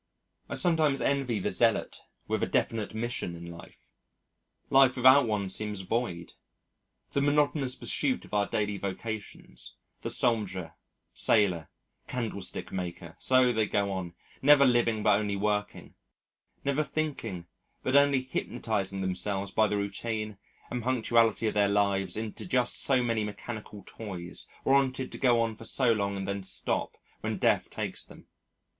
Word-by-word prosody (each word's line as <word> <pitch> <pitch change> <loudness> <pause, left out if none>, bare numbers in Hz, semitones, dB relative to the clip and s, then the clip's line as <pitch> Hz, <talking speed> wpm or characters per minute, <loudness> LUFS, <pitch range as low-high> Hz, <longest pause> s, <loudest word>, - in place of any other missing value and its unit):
I - - -3
sometimes 160 -6 +2
envy 135 -5 0
the 95 - -1
zealot - - +1 0.3
with - - -1
a - - +1
definite 110 -2 -1
mission 115 -6 -2
in 85 0 -9
life. 85 0 -14 0.8
Life 135 -2 +6
without 130 +1 +6
one 105 -3 -1
seems 105 0 -2
void. 95 -4 -3 0.8
The 140 - +1
monotonous 145 -2 +2
pursuit 130 +2 -1
of - - -18
our 100 -1 +2
daily 105 -2 -1
vocations 105 +2 -5 0.3
the - - -3
soldier, 95 -7 +2 0.4
sailor, 90 -7 +2 0.4
candlestick 110 -6 -4
maker 85 -2 -5
so 130 -1 +4
they 110 -2 +1
go 100 -1 0
on, 90 -3 -4 0.3
never 140 0 +7
living 120 -4 +2
but 100 - +4
only 105 -1 -1
working, 105 +1 -2 0.7
never 140 +2 +2
thinking 135 - -3 0.4
but 130 - 0
only 140 -2 +5
hypnotising 105 -6 -3
themselves 95 +1 -2
by 110 -1 +3
the 105 - -1
routine 105 +1 -3 0.3
and 125 - -2
punctuality 115 -2 +2
of - - 0
their 100 -1 +3
lives 100 -1 +1
into 110 - -4
just 125 -7 +2
so 130 -3 +3
many 115 -2 0
mechanical 105 -1 -7
toys 90 -6 -7 0.2
warranted 135 -1 +2
to - - -7
go 115 -3 +3
for 110 - -12
so 120 +1 +3
long 100 -2 -1
and 95 -1 -4
then 100 0 -2
stop 95 - -2 0.2
when - - -3
Death - - +2
takes - - -3
them.... - - -15
110 Hz, 145 wpm, -29 LUFS, 100-125 Hz, 0.8 s, never